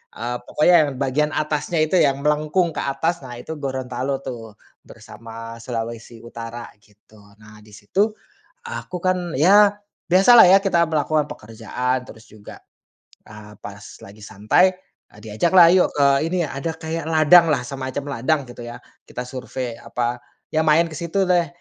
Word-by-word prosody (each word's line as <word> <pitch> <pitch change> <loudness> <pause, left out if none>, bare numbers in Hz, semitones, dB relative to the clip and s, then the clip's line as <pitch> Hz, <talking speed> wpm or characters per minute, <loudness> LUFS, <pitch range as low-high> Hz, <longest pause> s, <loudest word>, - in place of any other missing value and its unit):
eee, 120 +1 -4
pokoknya 175 +4 +3
yang - - -3
bagian 140 +3 -1
atasnya 155 +2 -2
itu, 165 +4 +1
yang 140 0 +1
melengkung 155 +4 +1
ke - - -6
atas, 160 +5 -2
nah 125 -2 -9
itu 125 +7 -8
Gorontalo 130 0 -4
tuh, 115 -5 -8 0.3
bersama 115 0 -11
Sulawesi 115 -1 -6
Utara 115 0 -8 0.2
gitu. 105 +1 -23 0.2
Nah, 110 0 -16
di 105 - -19
situ, 110 - -1 0.5
aku 470 - -7
kan, 180 -2 -1
ya 200 +8 +5 0.3
biasalah 195 +7 +7
ya 190 +2 +7
kita 175 -4 +2
melakukan 155 -1 0
pekerjaan, 125 +3 -4
terus 110 0 -15
juga, 105 -1 -13 0.7
eee, 105 -1 -13
pas - - -11 0.2
lagi 105 +2 -15
santai, 110 - +1 0.3
eee, 105 - -18
diajaklah, 170 - +4
yuk 185 - +3
ke 140 - +4 0.2
ini, 180 -1 -1
ada 150 +4 -5
kayak 160 0 -5
ladanglah. 155 -3 +5
Semacam 135 +1 -5
ladang 140 +3 0
gitu 120 0 -12
ya. 120 +1 -8 0.3
Kita 125 - -6
survey, 125 -2 -6
apa, 120 0 -3 0.3
ya 155 - +2
main 155 +2 +5
ke - - -8
situ 170 +3 -1
deh 175 -2 +2
135 Hz, 155 wpm, -21 LUFS, 115-165 Hz, 0.7 s, biasalah